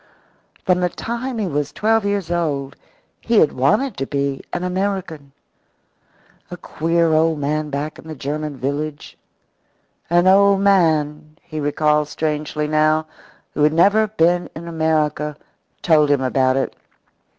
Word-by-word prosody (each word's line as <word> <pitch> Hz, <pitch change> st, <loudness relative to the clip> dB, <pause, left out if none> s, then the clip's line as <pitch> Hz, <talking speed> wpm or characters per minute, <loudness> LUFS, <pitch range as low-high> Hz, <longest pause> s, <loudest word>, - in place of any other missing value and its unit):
From 180 Hz, -1 st, +2 dB
the 180 Hz, 0 st, +1 dB
time 235 Hz, +6 st, -5 dB
he 215 Hz, -, -1 dB
was 145 Hz, -4 st, -2 dB
twelve 220 Hz, +3 st, +1 dB
years 200 Hz, -4 st, -2 dB
old 145 Hz, -6 st, -2 dB, 0.4 s
he 230 Hz, -1 st, 0 dB
had 155 Hz, -, +5 dB
wanted 150 Hz, -, +1 dB
to 135 Hz, -, -3 dB
be 140 Hz, -1 st, -2 dB
an 175 Hz, -, -3 dB
American. 180 Hz, -6 st, -3 dB, 1.2 s
A 180 Hz, -, -7 dB
queer 165 Hz, 0 st, 0 dB
old 160 Hz, 0 st, +2 dB
man 150 Hz, +1 st, -2 dB
back 145 Hz, +2 st, -4 dB
in -, -, -13 dB
the 160 Hz, -, -7 dB
German 150 Hz, +1 st, -4 dB
village 145 Hz, +3 st, -4 dB, 0.9 s
an 175 Hz, +1 st, +3 dB
old 200 Hz, +1 st, +5 dB
man, 155 Hz, -6 st, +1 dB
he 155 Hz, -2 st, -7 dB
recalled 150 Hz, +1 st, +1 dB
strangely 150 Hz, 0 st, -2 dB
now, 155 Hz, +1 st, +2 dB, 0.5 s
who -, -, -3 dB
had 150 Hz, +1 st, +4 dB
never 205 Hz, +6 st, +4 dB
been 175 Hz, -3 st, +1 dB
in 170 Hz, +1 st, -8 dB
America 155 Hz, -2 st, -1 dB, 0.5 s
told 155 Hz, -3 st, +4 dB
him 145 Hz, -2 st, +2 dB
about 130 Hz, 0 st, +1 dB
it. 135 Hz, -, -2 dB
155 Hz, 140 wpm, -20 LUFS, 150-180 Hz, 1.2 s, had